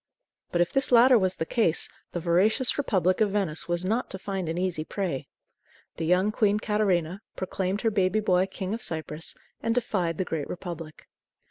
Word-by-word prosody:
But 175 - +2
if 175 - +1
this 270 -1 +1
latter 245 0 +7
was 185 -1 +1
the 160 - -3
case, 175 -5 +1 0.2
the 175 - -3
voracious 185 - +2
Republic 185 -7 +1
of 215 - +4
Venice 195 -6 +2
was 175 +1 -1
not 225 +6 0
to 190 - -4
find 190 -3 -4
an 165 - -3
easy 180 -4 -1
prey. 175 -6 -3 0.7
The 165 - -2
young 185 +4 +3
Queen 210 -1 +2
Catarina 200 -4 0
proclaimed 190 +1 -2
her 225 - +1
baby 195 0 +2
boy 185 -3 +2
King 190 +1 -5
of 230 - -4
Cyprus, 160 0 -3 0.3
and 230 0 0
defied 185 -9 -1
the 185 - -1
Great 155 -4 -4
Republic. 165 -3 -7
185 Hz, 185 wpm, -27 LUFS, 175-210 Hz, 0.7 s, latter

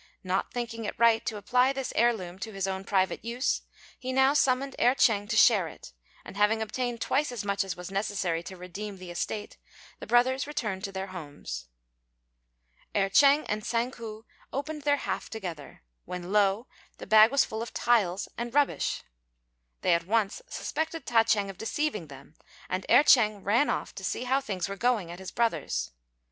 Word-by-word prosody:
Not 185 0 -1
thinking 230 -2 -4
it - - -4
right 230 0 +4
to 215 - -2
apply 250 +5 +2
this 270 -1 -4
heir 240 +1 +5
loom 185 -5 -7
to 220 +3 -5
his 195 -1 -2
own 190 0 -3
private 190 -1 +1
use, 240 +3 -1 0.4
he 255 0 -4
now 265 +1 +4
summoned 270 -1 +2
Erh 245 +2 +4
ch'êng 205 -5 +3
to 225 - 0
share 210 -7 +6
it; 65 - -12 0.3
and - - -10
having 210 +2 +3
obtained 240 +2 -3
twice 280 +2 +1
as 230 -4 -5
much 200 0 +1
as 190 -3 -4
was 180 +1 -8
necessary 195 -4 -1
to 185 +2 -9
redeem 195 +3 -7
the 185 -1 -9
estate, 205 +4 -4 0.4
the - - -8
brothers 255 +4 +3
returned 215 -10 -3
to 195 - -5
their 190 0 -4
homes. 145 - -7 1.3
Erh 195 -1 +2
ch'êng 285 +6 +5
and 210 +1 -1
Tsang 235 +3 0
ku 225 -2 -9 0.3
opened 300 +2 -4
their 285 0 +2
half - - -3
together, 175 - -7 0.2
when 180 0 -6
lo! 205 +2 +3 0.3
the - - -8
bag 215 +1 +7
was 275 +2 +3
full 220 +1 -5
of 235 - -5
tiles 200 -6 +1
and 240 +2 -4
rubbish. 290 -1 +1 0.8
They - - +3
at 170 0 0
once 215 - +1
suspected 320 - -3
Ta 225 -2 +4
ch'êng 205 -3 +2
of 190 - -18
deceiving 225 - -2
them, 140 +1 -13 0.4
and 185 0 -3
Erh - - +7
ch'êng 215 -8 +4
ran 230 +9 +3
off - - -2
to - - -9
see - - -2
how 265 +2 +1
things 195 -9 -3
were 200 - -5
going 215 -5 0
at 175 - -9
his 190 - -7
brother's. 225 - -1
215 Hz, 190 wpm, -28 LUFS, 190-245 Hz, 1.3 s, bag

